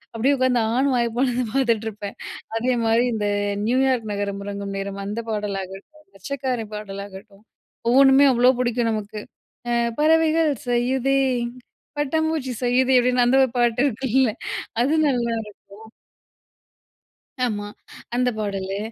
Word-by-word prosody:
அப்டியே 270 +5 +2
உட்காந்து 255 -2 +2
ஆன்னு 265 +1 +2
வாய 235 0 +2
பொலந்து 250 -1 +1
பாத்துட்டு 230 -5 +1
இருப்பேன். 205 -1 -8 0.4
அதேமாரி 235 -1 +2
இந்த 210 -1 -1 0.4
"நியூயார்க் 255 -3 +1
நகரம் 200 0 -3
உறங்கும் 200 -1 -5
நேரம்" 200 0 -5
அந்த 210 +3 -4
பாடலாகட்டும், 200 +8 -5
"மச்சக்காரன்" 245 0 -4
பாடலாகட்டும் 200 0 -9 0.5
ஒவ்வொண்ணுமே 270 +2 +6
அவ்ளோ 245 +1 +4
புடிக்கும் 240 -2 0
நமக்கு, 215 0 -4 0.8
பறவைகள் 320 0 +3 0.2
செய்யுதே 260 +3 +1 0.8
பட்டாம்பூச்சி 310 -2 -1
செய்யுதே 255 +1 +3
அப்டின்னு 250 0 +2
அந்த 255 +2 +3
ஒரு 260 - +1
பாட்டு 240 0 +2
இருக்குல 260 -1 +1 0.5
அது 280 +5 +2
நல்லாருக்கும். 235 -4 -1 2.0
ஆமா. 205 -3 -3 0.5
அந்த 250 0 +2
பாடலு. 195 -2 -3
240 Hz, 110 wpm, -22 LUFS, 210-265 Hz, 2.0 s, ஒவ்வொண்ணுமே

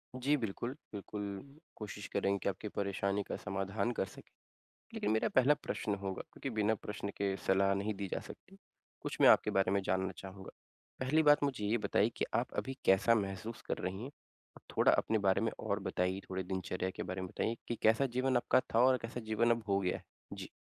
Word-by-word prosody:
जी, 135 +4 +2
बिल्कुल। 120 +3 -3 0.2
बिल्कुल, 105 +7 -6 0.2
कोशिश 105 -2 -7
करेंगे 100 0 +2
कि - - +2
आपकी 100 +3 -5
परेशानी 100 0 0
का - - -4
समाधान 100 +4 -2
कर - - +2
सकें। - - -14 0.6
लेकिन 105 - 0
मेरा 110 - +2
पहला 135 +3 +7
प्रश्न 105 -1 -1
होगा, 95 -1 -3
क्योंकि 135 - -5
बिना 105 +1 +3
प्रश्न 100 0 -5
के 100 -1 0
सलाह 95 +1 +4
नहीं 105 +2 -1
दी 100 - -1
जा - - -1
सकती, 195 +1 -13 0.4
कुछ - - -5
मैं - - +9
आपके - - +5
बारे 95 -1 +3
में 100 0 +2
जानना 95 0 0
चाहूँगा। 95 0 -9 0.5
पहली 150 +5 +3
बात 145 -1 +6
मुझे 130 -7 -1
ये 110 +3 +2
बताइए - - +2
कि - - +1
आप - - 0
अभी 135 0 -6
कैसा 95 +5 +5
महसूस 100 +2 -3
कर - - 0
रही 95 +5 -4
हैं। 135 - -6 0.5
और - - -19
थोड़ा - - +5
अपने 110 - +2
बारे 95 +2 +4
में 115 - +1
और - - -1
बताइए, 90 +2 0
थोड़े 95 0 -2
दिनचर्या 95 0 -2
के - - -5
बारे 95 +1 -4
में 95 - -4
बताइए 115 +5 -2
कि 120 - -1
कैसा 110 +5 +4
जीवन 130 -1 +3
आपका 120 - +3
था 115 - +4
और 130 -1 +5
कैसा 115 +1 -5
जीवन 115 +2 +3
अब 115 -1 +1
हो 100 0 +3
गया 90 -2 0
है? - - -15 0.3
जी। - - -7
105 Hz, 210 wpm, -34 LUFS, 95-120 Hz, 0.6 s, मैं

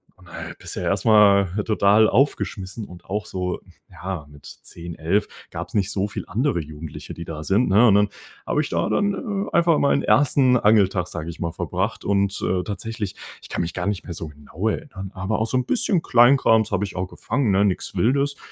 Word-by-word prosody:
Und - - -19
da - - -15 0.3
bist - - -7
du - - -1
erstmal 100 -3 +4 0.2
total 105 0 +4
aufgeschmissen 110 -6 -1
und 90 -2 -13
auch 105 +2 -3
so 90 -1 -3 0.3
ja, 90 -5 -6
mit 75 -1 -16
10, 85 0 -10
11, 90 +7 0 0.2
gab's - - -7
nicht 100 -2 +1
so 100 +1 -1
viele - - -7
andere 120 - 0
Jugendliche, 75 0 -9
die 85 - -8
da 80 -1 -6
sind, 100 +8 +2
ne? 105 +5 +5
Und 100 - +5
dann 105 0 +3 0.4
habe - - +1
ich - - -4
da - - 0
dann, 205 0 +1 0.3
äh, - - -8
einfach 170 -2 +4
meinen 140 - +2
1. 130 -2 +4
Angel-Tag, 100 -5 +3
sage 85 -1 -6
ich 85 - -9
mal, 85 -1 -1
verbracht - - -3
und, 100 0 +1
äh, 90 0 0
tatsächlich, 105 0 -5 0.3
ich - - -13
kann - - -2
mich 85 0 -3
gar 90 +1 -3
nicht 100 -2 -2
mehr 85 - -6
so 80 -1 -6
genau 75 +8 -4
erinnern, 105 - -6
aber 95 +3 -2
auch 110 - 0
so 130 - 0
'n 125 - 0
bisschen 205 - +1
Kleinkrams 120 -4 +4
habe 100 +1 0
ich 95 - -9
auch 90 +1 -2
gefangen, 125 -4 -1
ne? 100 +2 +3
Nichts 95 - -1
Wildes. 140 +4 +1
100 Hz, 205 wpm, -22 LUFS, 90-115 Hz, 0.4 s, ne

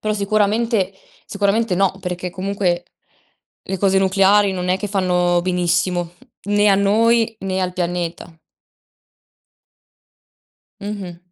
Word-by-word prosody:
Però 215 0 -1
sicuramente 210 0 0 0.3
sicuramente 205 +1 0
no, 190 +1 +1
perché 180 0 -4
comunque 185 -2 -2 0.8
le 190 -1 -4
cose 195 -1 +3
nucleari 195 +1 +3
non 180 -1 -3
è 185 +1 +1
che 205 - -4
fanno 180 -3 +1
benissimo, 175 -1 0 0.3
né 205 +1 +2
a 200 - +5
noi 225 +3 +2
né 190 -1 -2
al 180 -1 -1
pianeta. 170 -2 -4 2.4
Mh-mh. 200 -4 -6
190 Hz, 110 wpm, -19 LUFS, 180-205 Hz, 2.4 s, a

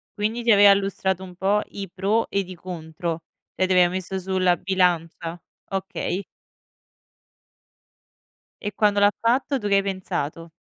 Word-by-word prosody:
Quindi 220 +3 -1
ti 230 - +4
aveva 205 -1 +8
illustrato 190 -1 -1
un 180 -1 -10
po' 195 +3 +2
i 200 -1 -6
pro 205 +5 +1
ed 195 -2 -1
i 185 - -7
contro? 165 -1 -5 0.3
E 185 - +1
te 185 - +2
le 180 - +7
ha 175 - +3
messe 185 +1 -3
sulla 185 -1 +2
bilancia? 175 -2 0 0.3
Okay. 195 0 -3 2.3
E 205 - -3
quando 205 0 +2
l'ha 205 0 +5
fatto, 260 +4 +1
tu 210 - -3
che 200 - +3
hai 195 - +3
pensato? 170 -4 -4
190 Hz, 150 wpm, -24 LUFS, 180-205 Hz, 2.3 s, aveva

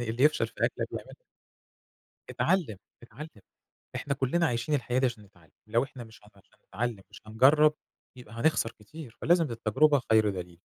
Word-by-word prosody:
يعني 120 -2 -3
اللي 120 +3 -2
يفشل 150 - +3
في - - -18
أكله - - -1
بيعملها - - -8 1.2
اتعلّم، 165 - 0 0.3
اتعلّم، 120 -1 -11 0.5
إحنا 140 - -2
كلّنا 160 +6 +1
عايشين 120 +3 -1
الحياة 125 -2 -1
دي 130 - +2
عشان 120 -4 -3
نتعلم. 90 -6 -23 0.2
لو 115 +3 +2
إحنا 130 -2 -9
مش 110 0 -15
هنت 105 -1 -22
مش 95 - -24 0.2
هنتعلم، 110 -2 -4
مش - - -13
هنجرب، 150 +7 +5 0.4
يبقى 120 -3 -13
هنخسر 115 -1 +1
كتير. 125 +2 -12
فلازم، 165 -5 +3
التجربة 130 +6 +2
خير 110 -1 +5
دليل. 90 -2 -6
120 Hz, 170 wpm, -28 LUFS, 110-150 Hz, 1.2 s, هنجرب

